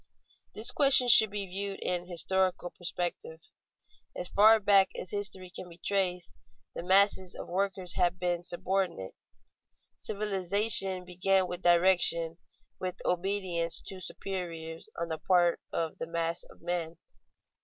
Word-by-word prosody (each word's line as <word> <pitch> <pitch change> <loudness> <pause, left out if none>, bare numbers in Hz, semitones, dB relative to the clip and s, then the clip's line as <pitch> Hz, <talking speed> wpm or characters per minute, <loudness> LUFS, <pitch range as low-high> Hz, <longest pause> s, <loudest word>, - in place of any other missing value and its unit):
_ - - -43
This 215 - +4
question 275 -3 +5
should 220 -2 +7
be 200 0 -4
viewed 195 +1 -5
in 180 -1 -2
historical 185 0 0
perspective. 175 -2 -5 0.8
As 180 - -1
far 220 +2 +5
back 195 -2 +4
as 180 - -6
history 195 -3 -3
can 180 - -5
be 170 - -14
traced, 180 -3 -1 0.4
the - - -6
masses 190 0 +3
of - - -8
workers 190 -1 0
have 180 -1 +1
been 175 -1 -2
subordinate. 175 - -2 0.8
Civilization 195 -1 0
began 185 +1 +1
with 180 0 -6
direction, 175 -2 +3 0.4
with 185 -1 -4
obedience 180 -2 +1
to 190 - -5
superiors 170 -4 -6
on 170 - -2
the 160 -1 -4
part 175 0 +2
of 165 -1 -4
the 165 - -5
mass 165 0 -2
of - - -19
men. 170 -1 -3
180 Hz, 135 wpm, -29 LUFS, 175-195 Hz, 0.8 s, should